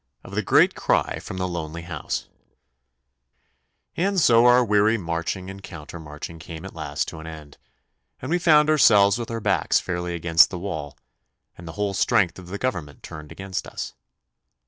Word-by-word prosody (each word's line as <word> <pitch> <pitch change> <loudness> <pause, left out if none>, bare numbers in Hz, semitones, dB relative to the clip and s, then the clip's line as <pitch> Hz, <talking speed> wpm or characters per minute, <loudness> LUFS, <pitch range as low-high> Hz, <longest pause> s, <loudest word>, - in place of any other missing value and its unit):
Of - - -12
the - - 0
Great - - +4
Cry - - 0
from 95 - -8
the 95 0 -1
Lonely 85 -1 -5
House 80 -4 -4 1.7
And 195 +2 +1
so 120 -5 +5
our 125 0 +6
weary 105 +1 +3
marching 85 0 -3
and 95 0 -9
counter 85 -2 -9
marching 80 +1 -9
came 80 +2 -9
at 95 - -9
last 75 -3 -3
to 80 - -9
an 80 - -9
end, 75 -3 -11 0.6
and 130 - -6
we 175 - +2
found 150 -3 +5
ourselves 110 -8 +5
with 120 - -5
our 115 0 -3
backs - - +2
fairly 90 -1 -3
against 85 -1 +5
the - - -5
wall, 80 -6 -5 0.6
and 85 - -12
the 80 - -7
whole 105 -1 -2
strength 95 -1 +2
of 90 - -12
the 100 +3 -5
Government 90 - -4
turned 75 -1 -9
against 95 -1 -5
us. - - -6
90 Hz, 175 wpm, -24 LUFS, 80-105 Hz, 1.7 s, our